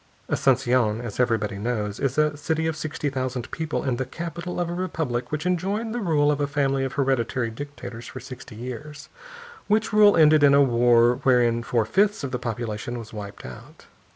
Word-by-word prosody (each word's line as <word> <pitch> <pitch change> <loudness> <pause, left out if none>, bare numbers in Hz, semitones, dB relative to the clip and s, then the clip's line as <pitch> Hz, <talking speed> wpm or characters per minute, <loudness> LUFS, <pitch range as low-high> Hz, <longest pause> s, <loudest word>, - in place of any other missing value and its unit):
Asunción, 125 -4 +2
as 115 -1 -7
everybody 110 -5 0
knows, 105 -2 -2
is 135 0 -1
a 150 -1 +2
city 160 +2 -1
of 160 -1 -1
sixty 150 -1 -3
thousand 130 -2 -3
people, 160 -2 -3
and 130 -3 -1
the - - +1
capital 170 +5 -6
of 175 - 0
a 170 - -4
republic 160 -9 -3
which 155 +2 -3
enjoyed 195 +5 -1
the 240 - -2
rule 150 -6 +2
of 145 0 -1
a 145 - +1
family 135 -1 0
of 135 - -3
hereditary 130 -3 0
dictators 125 -2 -8
for 130 - -8
sixty 130 -2 -10
years; 130 +6 -8 0.6
which 215 +1 +1
rule 210 -2 +6
ended 155 -1 +6
in 140 -1 +6
a 140 - +6
war 120 -1 +4
wherein 120 -3 +3
four 115 -1 0
fifths 200 - +1
of 135 - -3
the 125 - -2
population 115 0 -4
was 115 -2 -9
wiped 100 -1 -8
out. 60 0 -12
130 Hz, 190 wpm, -24 LUFS, 120-155 Hz, 0.6 s, rule